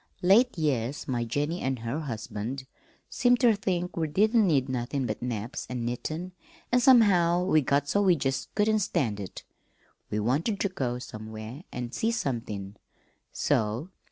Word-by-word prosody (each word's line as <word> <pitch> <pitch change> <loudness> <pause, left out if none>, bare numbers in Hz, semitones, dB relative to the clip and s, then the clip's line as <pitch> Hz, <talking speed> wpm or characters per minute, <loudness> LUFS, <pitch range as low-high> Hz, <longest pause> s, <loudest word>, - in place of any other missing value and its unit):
Late 215 +6 +5
years 140 -4 -1
my 120 -3 -1
Jennie 145 +9 -2
an' 130 0 -1
her 115 +6 -3
husband 120 -1 -5 0.4
seemed 245 0 +3
ter 240 -3 +5
think 180 -3 -2
we 160 -2 0
didn't 215 +6 +3
need 140 -6 +2
nothin' 130 +1 -2
but 110 -3 -3
naps 120 +2 -4
an' 125 -2 -3
knittin', 155 +9 -4 0.4
an' 250 - +5
somehow 195 -9 +5
we 155 -4 +3
got 140 +1 +1
so 200 +7 +2
we 190 -3 +5
jest 135 -3 -2
couldn't 215 +1 +3
stand 135 - 0
it. 95 -3 -7 0.7
We 105 - -1
wanted 145 - 0
ter 200 - +1
go 125 -9 -2
somewhere 110 +4 -8
an' 120 -1 -5
see 225 - 0
somethin', 115 - -3 0.5
so." 115 - 0
140 Hz, 155 wpm, -28 LUFS, 120-185 Hz, 0.7 s, Late